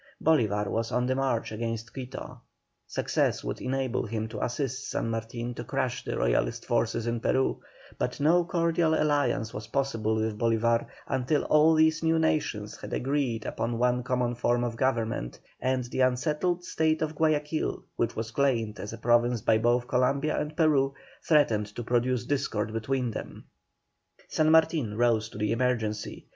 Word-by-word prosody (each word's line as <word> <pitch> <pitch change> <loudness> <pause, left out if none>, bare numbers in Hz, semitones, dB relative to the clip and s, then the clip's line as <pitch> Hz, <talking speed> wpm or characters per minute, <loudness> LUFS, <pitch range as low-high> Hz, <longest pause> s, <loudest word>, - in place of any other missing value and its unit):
Bolívar 110 -10 +2
was 115 +3 -2
on 125 0 +1
the 130 - +1
march 130 -5 -1
against 115 0 -4
Quito; 130 -1 -7 0.5
success - - 0
would - - -4
enable 130 -2 -1
him 110 0 -3
to 110 -1 -4
assist 130 +1 -3
San 115 - -2
Martin 115 +2 -4
to 120 - -6
crush 130 0 -2
the - - -3
Royalist - - 0
forces 115 - 0
in 120 0 -1
Peru, 130 +3 +1 0.4
but - - -2
no 165 +5 +4
cordial 165 -2 +1
alliance 145 -7 +1
was 105 0 -6
possible 115 -6 0
with 110 -1 -1
Bolívar 115 0 +2 0.2
until 135 +3 0
all 155 +1 +5
these 160 0 +3
new 165 0 +2
nations 115 -10 0
had - - -7
agreed 130 -5 -1
upon 115 +1 -2
one 125 +1 +2
common 125 -1 0
form 120 0 +1
of 120 -1 -2
government, 115 - -1 0.2
and 130 0 +1
the 120 +2 -5
unsettled 150 +7 +1
state 160 -2 +1
of 155 0 -2
Guayaquil, 155 0 0
which 115 -1 -1
was 110 0 -4
claimed 115 -5 0
as 105 - -6
a - - -6
province 120 0 +2
by 110 +1 +3
both 120 +2 +2
Columbia 135 +4 +1
and 150 +1 -5
Peru, 140 -4 +3 0.3
threatened 115 -10 +3
to 120 - -4
produce 120 +1 0
discord 110 -6 -1
between 125 +2 -1
them. - - -7 0.9
San 155 0 +2
Martin 160 -9 +3
rose 115 -2 +2
to - - -11
the 105 0 0
emergency. 115 -3 -1
125 Hz, 165 wpm, -28 LUFS, 115-140 Hz, 0.9 s, all